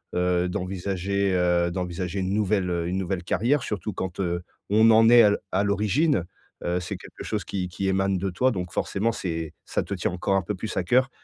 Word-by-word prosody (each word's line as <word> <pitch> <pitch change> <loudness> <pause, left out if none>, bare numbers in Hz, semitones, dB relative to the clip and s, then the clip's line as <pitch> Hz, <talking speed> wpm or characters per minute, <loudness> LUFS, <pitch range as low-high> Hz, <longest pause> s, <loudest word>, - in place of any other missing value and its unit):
heu, 90 0 +2
d'envisager, 95 +1 -1
heu, 90 -1 +2
d'envisager 90 +1 -3
une 95 +1 -1
nouvelle, 100 -3 +1
heu, 85 -1 -1
une 90 +2 -1
nouvelle 95 -1 -2
carrière 125 +9 +1
surtout 105 0 -3
quand, 95 0 -5
heu, 85 -1 -1 0.3
on 110 +2 +5
en 115 +1 +6
est 120 -1 +8
à - - +7
l 105 - +2
à 95 +2 +2
l'origine. 105 - +2 0.4
Heu, 90 +1 0
c'est 90 - -5
quelque - - -11
chose - - -2
qui 90 -2 -3
qui 95 +2 -3
émane 95 0 +1
de 95 +2 -2
toi 130 +9 +2
donc 90 -4 -4
forcément 110 +4 0
c'est 80 -5 -4
ça - - -1
te - - -5
tient 90 -1 -1
encore 90 +2 0
un 95 - +3
peu 100 +3 -4
plus 110 +4 -5
à 95 - +1
cœur 125 +6 +3
95 Hz, 220 wpm, -25 LUFS, 90-105 Hz, 0.4 s, est